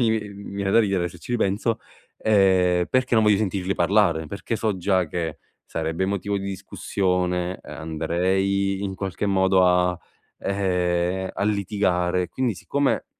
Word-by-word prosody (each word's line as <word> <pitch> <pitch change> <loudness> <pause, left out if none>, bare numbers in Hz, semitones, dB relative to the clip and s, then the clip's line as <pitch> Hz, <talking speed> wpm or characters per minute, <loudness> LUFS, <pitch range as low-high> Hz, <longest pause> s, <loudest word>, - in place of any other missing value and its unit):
mi 115 - +3
vi 110 -2 0
mi 100 0 -9
viene 100 -1 -1
da 115 - +5
ridere 95 -5 +2
se 90 - -13
ci 120 - -7
ripenso, 110 0 0 0.4
ehm, 95 -4 +3
perché 130 -1 +1
non 110 -1 +4
voglio 105 -1 +5
sentirli 95 -2 -1
parlare. 85 -3 +2
Perché 100 +6 -4
so 110 -3 0
già 95 -1 +1
che, 80 -1 -3 0.3
sarebbe 80 +3 -1
motivo 100 +1 -1
di 95 - -6
discussione, 90 -1 -1
ehm, - - -9
andrei 95 +5 0
in 95 -1 -3
qualche 95 +1 -3
modo 95 -1 +4
a, 90 -1 +2 0.4
ehm, 90 -1 0
a - - -3
litigare, 95 -3 0
quindi 125 -1 -1
siccome 140 +8 -1
95 Hz, 155 wpm, -24 LUFS, 90-100 Hz, 0.4 s, da